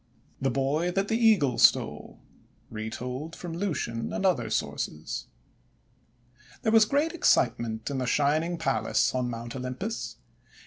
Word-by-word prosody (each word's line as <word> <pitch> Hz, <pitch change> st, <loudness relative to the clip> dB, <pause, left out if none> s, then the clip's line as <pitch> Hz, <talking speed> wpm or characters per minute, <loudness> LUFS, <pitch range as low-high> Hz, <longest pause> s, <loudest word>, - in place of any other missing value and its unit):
THE 135 Hz, -, +2 dB
BOY 140 Hz, +6 st, 0 dB
THAT 195 Hz, +3 st, -1 dB
THE 225 Hz, -, +2 dB
EAGLE 145 Hz, -, +3 dB
STOLE -, -, +3 dB, 0.5 s
Retold 125 Hz, +8 st, -5 dB
from 175 Hz, -2 st, -7 dB
Lucian 155 Hz, -, -2 dB
and 195 Hz, -, -2 dB
Other 125 Hz, -12 st, +2 dB
Sources 75 Hz, -3 st, -3 dB, 1.4 s
THERE 220 Hz, -, +2 dB
was 220 Hz, -1 st, +7 dB
great 290 Hz, +8 st, +1 dB
excitement 115 Hz, -, +1 dB
in 135 Hz, -, -2 dB
the 125 Hz, -, -2 dB
Shining 155 Hz, +6 st, +1 dB
Palace 135 Hz, -4 st, +1 dB
on 125 Hz, -1 st, -1 dB
Mount 120 Hz, +1 st, -6 dB
Olympus. 130 Hz, -, -4 dB
135 Hz, 130 wpm, -27 LUFS, 120-180 Hz, 1.4 s, was